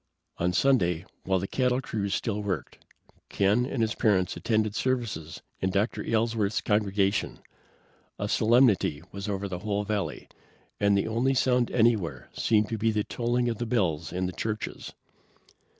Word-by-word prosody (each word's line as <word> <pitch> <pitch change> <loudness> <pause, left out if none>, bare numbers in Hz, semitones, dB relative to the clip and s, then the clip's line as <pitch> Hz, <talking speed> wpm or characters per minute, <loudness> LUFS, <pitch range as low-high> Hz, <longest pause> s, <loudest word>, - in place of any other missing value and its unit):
On 90 +1 +1
Sunday, 90 -7 +2 0.2
while 95 0 +2
the 95 - -2
cattle 125 +1 +1
crews 100 -6 -2
still 105 -3 -2
worked, 100 -5 -4 0.5
Ken 105 +5 +2
and 130 -4 -1
his 110 0 0
parents 95 -6 +1
attended 110 -2 0
services 105 -12 -2 0.2
in 95 - 0
Dr. 100 +4 0
Aylesworth's 110 -2 0
congregation. 100 -1 0 0.8
A 105 - -2
solemnity 110 - +3
was 100 +1 -5
over 100 0 -2
the 90 -2 -5
whole 105 +1 -1
valley, 105 -1 -3 0.5
and 100 -1 +3
the 100 - 0
only 120 +5 +1
sound 125 -1 +2
anywhere 110 -7 +1
seemed 105 -1 +2
to 115 - -3
be 115 +1 +2
the 105 -1 0
tolling 120 +2 -1
of 115 -3 -2
the 120 - -2
bells 95 -10 0
in 90 +1 -1
the 90 - -2
churches. 110 +4 -4
105 Hz, 155 wpm, -27 LUFS, 95-115 Hz, 0.8 s, solemnity